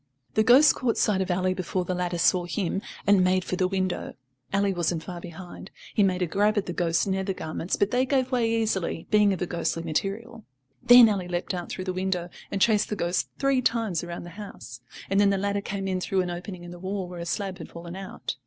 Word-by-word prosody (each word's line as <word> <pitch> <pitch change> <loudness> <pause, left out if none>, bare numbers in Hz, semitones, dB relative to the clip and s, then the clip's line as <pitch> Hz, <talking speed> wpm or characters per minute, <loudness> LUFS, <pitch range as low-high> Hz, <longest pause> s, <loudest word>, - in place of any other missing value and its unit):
The 220 - +3
ghost 260 +6 +7
caught 245 -3 -1
sight 195 -3 +2
of 190 - -2
Ally 185 +1 +1
before 185 0 -2
the 185 - -2
latter 180 -1 -2
saw 175 +1 +3
him, 190 +1 -2 0.2
and 200 -2 +5
made 185 0 +2
for 185 - -3
the 185 0 +1
window. 185 -1 -2 0.4
Ally 200 0 +2
wasn't 175 -2 -1
far 175 -2 -7
behind; 175 +2 -9 0.2
he - - +2
made 185 -2 +2
a - - +2
grab 205 +5 +1
at 205 - +1
the 175 - -4
ghost's 165 -2 +1
nether 190 0 -1
garments, 165 0 -3
but 200 - +1
they 255 +1 +2
gave 260 -1 +1
way 240 -3 +2
easily, 220 -7 -1
being 210 -1 +5
of 185 - -1
a - - 0
ghostly 170 -1 -2
material. 205 +8 -3 0.4
Then 245 -1 +9
Ally 195 -4 -1
leapt 175 +1 -2
out 175 -1 -4
through 185 - -5
the 185 - -2
window 185 -1 -2 0.2
and 195 - -2
chased 210 0 +3
the 210 - -1
ghost 175 -2 -1
three 275 -2 +2
times 225 -9 0
round 170 0 -6
the 175 - -9
house, 120 - -10 0.3
and 195 - +2
then 200 - +5
the 200 - +2
latter 200 +1 -1
came 195 -1 -4
in 185 -1 -1
through 190 +1 +1
an 180 -1 -3
opening 175 +1 -7
in 175 - -9
the 175 - -10
wall 190 0 -3
where 175 -1 -8
a 170 - -5
slab 195 0 -3
had - - -8
fallen 170 +1 -9
out. 190 -8 -6
190 Hz, 235 wpm, -26 LUFS, 175-205 Hz, 0.4 s, Then